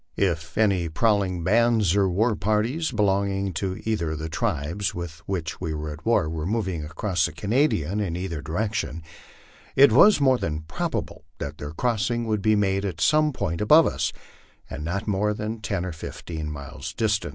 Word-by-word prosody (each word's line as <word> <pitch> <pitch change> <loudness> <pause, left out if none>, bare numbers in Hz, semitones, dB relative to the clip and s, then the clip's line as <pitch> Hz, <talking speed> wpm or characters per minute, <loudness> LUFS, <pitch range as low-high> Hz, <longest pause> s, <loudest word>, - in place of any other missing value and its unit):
If 85 -4 -1
any 100 -6 +2
prowling 95 -1 +1
bands 110 -1 +3
or 100 -2 +3
war 110 +5 +2
parties 115 +12 0
belonging 100 -2 +1
to 95 +2 -3
either 105 -8 0
of - - -4
the 80 +1 -5
tribes 90 0 -2
with 85 -3 -6
which 85 -5 -3
we 80 -3 -2
were 75 0 -4
at 75 +2 -12
war 115 -9 +3
were 80 0 -3
moving 95 -7 -1
across 85 +1 -1
the - - -8
Canadian 100 - 0
in 95 -5 -2
either 90 -4 -4
direction, 85 0 -2 0.7
it 140 -2 +7
was 200 - +7
more 130 -3 +4
than 75 -1 -2
probable 80 0 -4
that 70 +2 -6
their 75 - -5
crossing 120 +3 0
would 110 -2 0
be 110 +1 +3
made 100 -1 +1
at 90 -5 -3
some 150 - +3
point 85 - -3
above 155 +10 +6
us, - - 0 0.6
and 75 +1 -6
not 100 +6 -2
more 105 +1 +1
than 110 +2 -4
ten 100 -4 -2
or 90 - -3
fifteen 80 -1 -6
miles 70 -2 -7
distant. 110 -1 0
95 Hz, 180 wpm, -25 LUFS, 80-110 Hz, 0.7 s, it